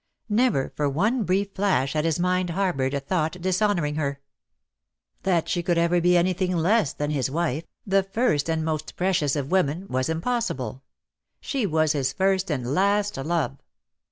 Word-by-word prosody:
Never 215 - +1
for 145 -1 0
one 215 - +1
brief 195 +2 0
flash 190 -9 +1
had 155 0 0
his 165 0 0
mind 180 0 +1
harboured 170 -7 0
a - - 0
thought 160 +4 -2
dishonouring 180 -4 0
her. 140 -2 -2 1.0
That 175 -4 +1
she 175 - 0
could 175 0 0
ever 170 +1 +2
be 175 +1 +4
anything 185 +1 +1
less 180 -1 +2
than 145 0 -3
his 135 -4 0
wife, 160 0 -1 0.2
the 195 0 +3
first 195 - 0
and 160 -1 0
most 155 -1 -3
precious 175 -6 +1
of 140 0 -3
women, 180 -1 +1
was 130 +2 -1
impossible. 160 - -2 0.6
She 265 -7 -1
was 155 -2 +2
his 135 -3 0
first 190 +2 +1
and 130 -4 -2
last 200 +4 +2
love. 140 -1 -2
170 Hz, 165 wpm, -25 LUFS, 145-190 Hz, 1.0 s, be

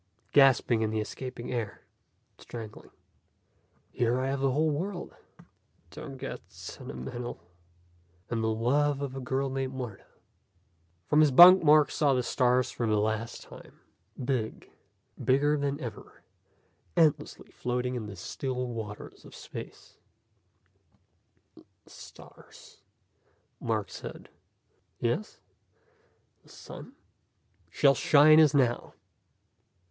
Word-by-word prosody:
Gasping 130 -4 +4
in 110 - 0
the 110 0 -2
escaping 125 +3 -6
air. 115 -4 -4 0.6
Strangling. 110 -3 -10 1.0
"Here 120 +1 0
I 130 +1 -1
have 135 0 -2
a 135 - +3
whole 155 +4 +1
world 175 +5 -4 0.4
" - - -38
"Don't 135 - -9
get - - -6
sentimental 120 - -7 0.5
" 85 +1 -36
"And 115 -1 -1
the - - +1
love 135 +6 +1
of 135 -1 -5
a - - -4
girl 135 +1 -2
named 135 0 -3
Martha." 120 -7 -7 1.0
From 150 - +2
his 155 -1 +6
bunk 175 +6 +9
Mark 150 -1 +5
saw 145 -4 +2
the 125 - 0
stars 125 +1 +1
for 120 - -2
the 110 -1 +2
last 110 +2 -2
time. - - -15 0.5
Big, 120 -5 -3 0.5
bigger 145 +3 +3
than 140 -1 -2
ever, 115 -4 -9 0.7
endlessly 160 -3 +1
floating 125 +1 -2
in 115 -4 -4
the 105 - -8
still 125 +7 -4
waters 110 -3 -8
of - - -14
space. - - -10 1.6
"The - - -19 0.3
stars - - -15 0.4
..." - - -42
Mark - - -2
said. - - -9 0.7
"Yes?" 120 - -2 1.0
"The - - -23
sun?" - - -11 0.4
" - - -40
shall 140 -2 +4
shine 155 +2 +6
as 150 -2 +5
now." 125 -4 +1
130 Hz, 120 wpm, -28 LUFS, 115-140 Hz, 1.6 s, bunk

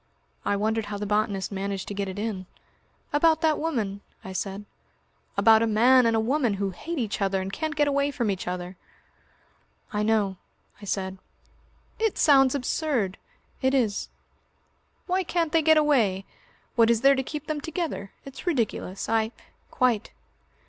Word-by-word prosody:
I 205 - +1
wondered 220 +2 0
how 205 0 -4
the 205 - -4
botanist 205 -1 0
managed 195 0 -3
to - - -4
get 200 0 -2
it 190 +1 -6
in. 205 -4 -3 0.7
"About 320 +2 +4
that 315 -2 +2
woman?" 220 -11 -2 0.2
I 190 - -6
said. 195 +2 -4 0.7
"About 220 +2 +6
a 230 - +2
man 240 +3 +5
and 230 - +2
a - - +3
woman 240 -1 +1
who 195 0 -2
hate 330 - -6
each 220 -5 -2
other 195 -1 +1
and 190 +1 -5
can't 310 -1 -3
get 295 0 +2
away 280 0 +1
from 235 -7 -1
each 190 -2 -4
other." 180 0 -4 1.2
"I 210 - 0
know," 210 -3 +1 0.4
I - - -8
said. 190 -1 -3 0.8
"It 445 -2 0
sounds 270 -2 +5
absurd." 250 - -1 0.4
"It 265 0 +2
is." 220 -6 0 1.0
"Why 370 +1 +1
can't 340 -3 -1
they 325 - +4
get 315 0 +5
away? 230 -11 +2 0.5
What 230 -2 +5
is 230 -1 +3
there 275 +1 +6
to 265 - 0
keep 295 +3 -6
them 305 -1 -3
together? 310 - -4
It's 275 +6 -10
ridiculous. 230 - -1
I 220 0 +1 0.2
" - - -39
"Quite." 240 -4 +1
225 Hz, 170 wpm, -26 LUFS, 200-285 Hz, 1.2 s, About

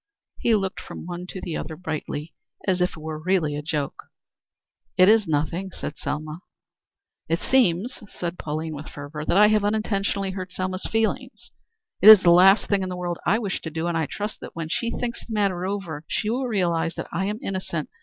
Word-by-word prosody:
He 230 - +3
looked 195 -2 -1
from - - -9
one 175 +1 -6
to 185 - -7
the 170 -3 -4
other 160 - -4
brightly 155 -1 -5 0.3
as 185 -2 +2
if 180 - +1
it - - -11
were 155 0 -5
really 165 -4 +1
a 150 - -3
joke. 150 -2 -3 0.9
"It 185 0 +7
is 215 -1 +5
nothing," 160 +5 -1
said 155 -4 -7
Selma. 155 +2 -4 0.9
"It 165 +1 +1
seems," 240 -2 +2
said 175 0 -5
Pauline 155 +1 -3
with 150 +1 -7
fervor, 145 +1 -7
"that 175 - +2
I 210 +1 +7
have 215 -1 +3
unintentionally 200 -2 0
hurt 185 -1 -6
Selma's 185 0 -3
feelings. 225 0 -1 0.5
It 210 - +10
is 215 -3 +11
the 170 - +6
last 190 +4 +7
thing 200 -1 +2
in 185 - -2
the 180 - -4
world 175 -1 -3
I 215 - +4
wish 205 -5 -3
to 160 - -5
do, 160 +1 -3
and 170 -1 -1
I 160 -2 0
trust 210 +1 -5
that - - -10
when 165 -1 -4
she 230 +7 -1
thinks 235 0 -3
the 230 - -8
matter 190 -3 0
over 185 -7 -4
she 215 - -1
will 255 +2 -1
realize 170 -6 0
that - - -4
I 185 +3 -1
am 210 +2 -2
innocent. 190 -8 -3
180 Hz, 205 wpm, -24 LUFS, 160-200 Hz, 0.9 s, is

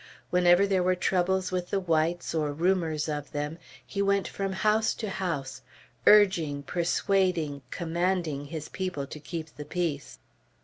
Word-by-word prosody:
Whenever 180 +1 +5
there 195 -2 +2
were 185 +1 +2
troubles 185 +1 +1
with 180 -1 -2
the 200 - +1
whites, 170 -1 0
or 155 -2 0
rumors 165 -1 0
of 145 -2 -4
them, 150 +3 -3 0.3
he 165 +11 -3
went 200 -1 +2
from 195 -1 -3
house 215 +3 +2
to 215 -4 -4
house, 140 -9 -3 0.5
urging, 170 -9 +5
persuading, 175 -2 0
commanding 170 -3 -1
his 155 0 -6
people 185 -7 -3
to 150 - -9
keep 160 0 -7
the 150 - -6
peace. 165 -5 -3
175 Hz, 145 wpm, -28 LUFS, 150-190 Hz, 0.5 s, Whenever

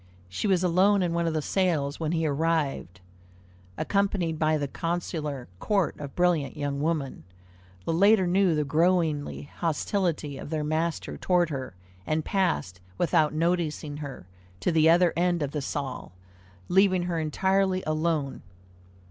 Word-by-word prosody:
She 95 - -2
was 185 -2 +2
alone 185 +3 +3
in 170 -2 -1
one 170 0 0
of 160 - -1
the 155 - -1
salles 155 -7 0
when 160 -1 -1
he 165 -1 0
arrived, 145 - -1 0.8
accompanied 195 -5 0
by 155 0 +2
the 145 -1 -2
consular 155 -4 -3
court 195 -6 0
of 140 -2 -7
brilliant 175 -5 +1
young 145 -1 -2
women. 150 - -2 0.6
The - - 0
latter 200 +3 +5
knew 180 -1 +3
the 150 - +1
growing 160 0 +2 0.4
hostility 165 -3 -1
of - - -8
their 155 -1 -2
master 160 +2 -2
toward 175 -3 +1
her, 130 -8 -5 0.3
and 155 0 0
passed, 175 - 0 0.2
without 155 - +2
noticing 160 -3 -1
her, 140 -10 -7 0.4
to - - +1
the 160 -1 +4
other 170 +1 +4
end 175 -2 +1
of 140 - -3
the 150 - -3
salle, 135 -7 -5 0.5
leaving 185 -1 +3
her 175 -2 -2
entirely 190 +4 +1
alone. 155 -2 -1
165 Hz, 150 wpm, -27 LUFS, 150-180 Hz, 0.8 s, latter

